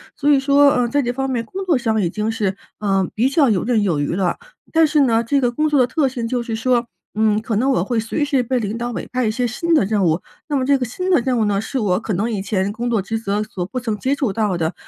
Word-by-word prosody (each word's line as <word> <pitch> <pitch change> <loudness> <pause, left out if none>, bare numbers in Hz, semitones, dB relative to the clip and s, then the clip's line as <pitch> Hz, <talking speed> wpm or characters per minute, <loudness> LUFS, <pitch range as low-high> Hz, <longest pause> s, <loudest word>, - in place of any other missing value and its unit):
所 290 - 0
以 285 -2 +5
说， 280 +1 +5
呃， 245 -1 +1
在 285 +4 +1
这 245 -2 -1
方 270 +2 -2
面 245 -3 -1
工 380 - -6
作 340 - +3
上 225 -4 0
已 - - +1
经 215 +5 -2
是， 205 -4 -1 0.2
呃， 195 -3 0
比 235 +4 +2
较 280 -1 +3
游 200 -5 +1
刃 230 -2 +1
有 175 -7 0
余 145 +4 -1
了。 190 -2 0 0.3
但 325 0 +5
是 305 0 +2
呢， 230 -4 +3
这 275 +4 +1
个 245 -1 +1
工 305 +6 0
作 295 -2 +2
的 250 - +4
特 300 -1 +1
性 250 -3 -4
就 245 +1 -1
是 235 -1 -4
说， 240 +1 +1 0.3
嗯， 215 -1 +2
可 225 0 -3
能 255 +5 +1
我 265 - +2
会 240 -3 -1
随 225 +7 -2
时 280 -3 +1
被 250 +1 -1
领 210 0 -3
导 240 +1 -3
委 - - -5
派 255 -1 0
一 - - +1
些 245 +3 -1
新 290 +9 -2
的 300 - +4
任 205 -1 0
务， 165 0 +1 0.3
那 295 - -2
么 260 -2 +1
这 280 0 +3
个 250 - -1
新 365 +11 -3
的 350 - +5
任 250 0 0
务 220 - +2
呢 200 -1 +1
是 225 - -4
我 200 -7 +1
可 220 -1 -3
能 215 +6 -1
以 205 - -2
前 190 0 -1
工 235 +3 -3
作 225 -4 +1
职 225 +3 -3
责 205 -1 -1
所 195 -4 -5
不 255 +6 -4
曾 230 -3 -2
接 270 +5 0
触 265 -8 -1
到 205 -4 0
的， 160 -1 -1
235 Hz, 320 characters per minute, -20 LUFS, 210-265 Hz, 0.3 s, 以